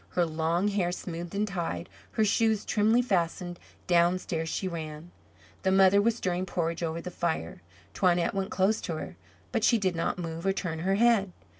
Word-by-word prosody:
Her 175 - +1
long 165 +4 0
hair 190 -4 0
smoothed 175 0 -6
and 210 +1 0
tied, 170 - -3 0.3
her 220 - +2
shoes 220 0 +2
trimly 220 +3 +3
fastened, 175 -4 -1 0.3
downstairs 175 -2 +1
she 190 - -2
ran. 160 -1 -6 0.5
The 190 - +1
mother 190 +1 +6
was 225 +1 +2
stirring 185 -4 -2
porridge 170 -2 -2
over 165 0 -2
the 180 - -6
fire. 160 - -3 0.3
Toinette 175 -2 +2
went 195 -1 -2
close 195 +3 +1
to 165 - -3
her, 155 - -6 0.4
but - - 0
she 235 - +5
did 190 -4 0
not 165 - -1
move 165 -1 -5
or 195 - +3
turn 170 -4 -3
her 190 +4 +1
head. 220 -3 +3
180 Hz, 180 wpm, -28 LUFS, 170-195 Hz, 0.5 s, mother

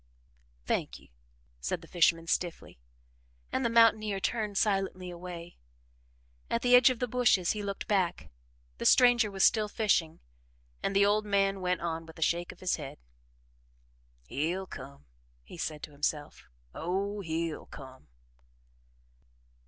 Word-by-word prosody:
"Thank - - -1
you," - - -21 0.5
said 60 0 -3
the - - -13
fisherman 165 -1 +2
stiffly, 170 - -3 0.7
and 265 - -1
the 235 - +2
mountaineer 220 -3 +4
turned 210 -1 -2
silently 195 -3 0
away. 175 -1 -9 0.9
At 235 - -1
the 250 0 +6
edge 250 +1 +7
of 255 - -1
the 250 - -2
bushes, 220 -7 +2
he 210 - -3
looked 200 -1 -5
back; 175 - 0 0.5
the - - -4
stranger 245 -3 +5
was 195 -1 -1
still 215 -2 +4
fishing, 180 -8 +1 0.6
and 195 - -2
the 200 0 +5
old 210 +1 +2
man 195 -1 +1
went 180 -1 0
on 165 -1 -3
with 160 - -13
a 165 - 0
shake 170 +2 0
of - - -17
his 185 - 0
head. 145 -2 -8 1.3
"He'll 170 - -2
come," 140 - -11 0.4
he 170 - -12
said 155 -2 -4
to - - -7
himself. 145 +1 -3 0.3
"Oh, 195 +5 -2
he'll 165 -2 -3
come!" 130 -2 -12
185 Hz, 145 wpm, -30 LUFS, 165-210 Hz, 1.3 s, edge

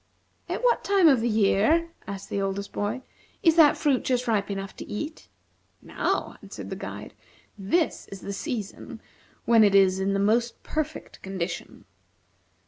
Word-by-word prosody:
"At - - -3
what 485 -1 +3
time 390 -4 +4
of 265 -6 +5
the 240 - +1
year," 220 +10 +3 0.2
asked 195 -1 -7
the 200 - -1
oldest 195 +1 -3
boy, 220 +6 -3 0.4
"is 330 -2 +5
that 315 -3 +6
fruit 280 -5 +1
just 250 -1 0
ripe 210 -3 +1
enough 195 -1 -5
to - - -8
eat?" 300 +9 -6 0.5
"Now," - - -2
answered - - -9
the - - -3
guide. - - -8 0.4
"This 230 - 0
is 195 -1 -10
the 200 - -5
season 205 +1 -5 0.5
when 230 -2 +6
it 200 -1 +4
is 190 -1 +5
in 195 +1 0
the 195 - 0
most 230 +4 +1
perfect 310 0 -4
condition. 185 -3 -5
215 Hz, 160 wpm, -26 LUFS, 195-290 Hz, 0.5 s, that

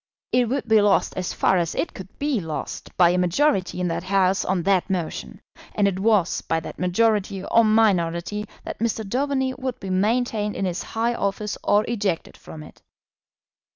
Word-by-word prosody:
It 245 -2 +2
would 265 -1 -2
be 220 -1 +5
lost 205 -1 +2
as 185 -1 -3
far 190 - +2
as 170 -2 -1
it 335 - -2
could 190 0 -11
be 285 -5 0
lost 160 -2 -5
by 175 -1 +6
a 180 - +1
majority 180 - +1
in 180 - 0
that 170 +1 -3
House 190 0 +2
on 185 -2 -1
that 195 0 +2
motion; 175 -4 -4 0.3
and 205 -1 +3
it 190 -1 -1
was 210 -4 +2
by 165 - -1
that - - -9
majority 195 +1 +1
or 230 - +4
minority 210 -2 +1 0.2
that - - -7
Mr. 220 -1 -1
Daubeny 265 +3 0
would 255 -2 -4
be 190 -2 -5
maintained 210 +2 0
in 195 - -2
his 180 -1 -2
high 230 +2 -1
office 205 -1 -2
or 205 +1 +3
ejected 200 -7 -2
from 155 -1 -11
it. - - -15
200 Hz, 185 wpm, -23 LUFS, 180-225 Hz, 0.3 s, by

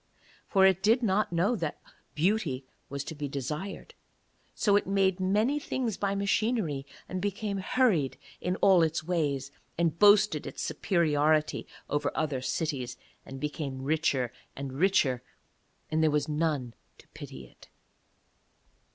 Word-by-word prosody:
For 190 -2 +4
it 190 -1 +4
did 225 +5 +3
not 205 -1 +1
know 175 +8 +2
that 165 -8 -3 0.4
beauty 160 - 0 0.2
was 140 0 -4
to 160 - -6
be 145 -1 -4
desired; 150 +8 -5 0.6
so 205 -2 +3
it 205 - +2
made 195 -1 +2
many 210 +10 +2
things 250 -7 -2
by 200 -1 -1
machinery, 200 - 0 0.2
and 185 0 -4
became 205 0 -2
hurried 185 - +2 0.2
in 180 +1 0
all 190 -3 +6
its 160 -1 +1
ways, 145 -6 -1 0.3
and 170 -1 0
boasted 205 -6 +5
its - - -5
superiority 155 -4 +1 0.2
over 145 0 0
other 145 -5 -1
cities 130 -3 -2 0.3
and 135 0 -7
became 140 -2 -4
richer 140 -4 +1 0.2
and 135 -1 -5
richer, 140 -6 +2 0.7
and 160 0 +2
there 160 - +4
was 150 0 +1
none 150 -6 -1 0.2
to - - -19
pity 65 -1 -9
it. - - -19
160 Hz, 140 wpm, -29 LUFS, 145-200 Hz, 0.7 s, all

